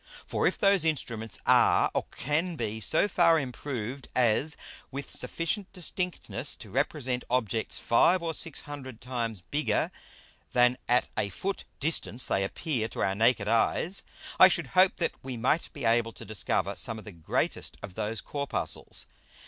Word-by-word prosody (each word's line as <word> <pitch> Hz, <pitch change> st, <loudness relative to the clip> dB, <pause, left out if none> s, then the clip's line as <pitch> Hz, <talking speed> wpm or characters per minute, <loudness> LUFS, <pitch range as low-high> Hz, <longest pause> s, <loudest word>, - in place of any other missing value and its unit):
For -, -, +1 dB
if -, -, 0 dB
those 195 Hz, -4 st, +4 dB
Instruments 115 Hz, -9 st, -1 dB
are -, -, +5 dB
or -, -, 0 dB
can 160 Hz, +5 st, -1 dB
be 110 Hz, -6 st, -3 dB
so 160 Hz, -, +3 dB
far 170 Hz, -4 st, +4 dB
improved 130 Hz, -1 st, -5 dB
as 125 Hz, +5 st, +2 dB, 0.3 s
with 140 Hz, +1 st, -6 dB
sufficient 180 Hz, +4 st, -2 dB
distinctness 180 Hz, 0 st, -3 dB
to -, -, -11 dB
represent 130 Hz, -2 st, -1 dB
Objects 115 Hz, -3 st, 0 dB
five 170 Hz, +9 st, +4 dB
or 165 Hz, -1 st, -1 dB
six 160 Hz, -1 st, -5 dB
hundred 130 Hz, -5 st, -8 dB
times 115 Hz, -5 st, -3 dB
bigger 150 Hz, +1 st, +1 dB, 0.6 s
than 125 Hz, 0 st, +4 dB
at 125 Hz, +1 st, +3 dB
a 100 Hz, -, 0 dB
Foot 195 Hz, -, -3 dB
distance 140 Hz, -5 st, -1 dB
they 95 Hz, -, +1 dB
appear 120 Hz, -, -2 dB
to -, -, -3 dB
our 95 Hz, +2 st, +1 dB
naked 110 Hz, 0 st, +3 dB
Eyes, 115 Hz, -, +1 dB, 0.4 s
I 185 Hz, -, +11 dB
should 170 Hz, -6 st, -1 dB
hope 185 Hz, +1 st, +5 dB
that 170 Hz, -, 0 dB
we 130 Hz, -2 st, -5 dB
might 130 Hz, +8 st, +1 dB
be 140 Hz, -4 st, -6 dB
able 115 Hz, 0 st, +3 dB
to -, -, -10 dB
discover 110 Hz, 0 st, -1 dB
some 115 Hz, -, -1 dB
of 110 Hz, -, -10 dB
the 105 Hz, -, -8 dB
greatest 85 Hz, -3 st, -2 dB
of 95 Hz, -, -7 dB
those 110 Hz, +1 st, -3 dB
Corpuscles. 140 Hz, -2 st, 0 dB
130 Hz, 160 wpm, -29 LUFS, 115-160 Hz, 0.6 s, I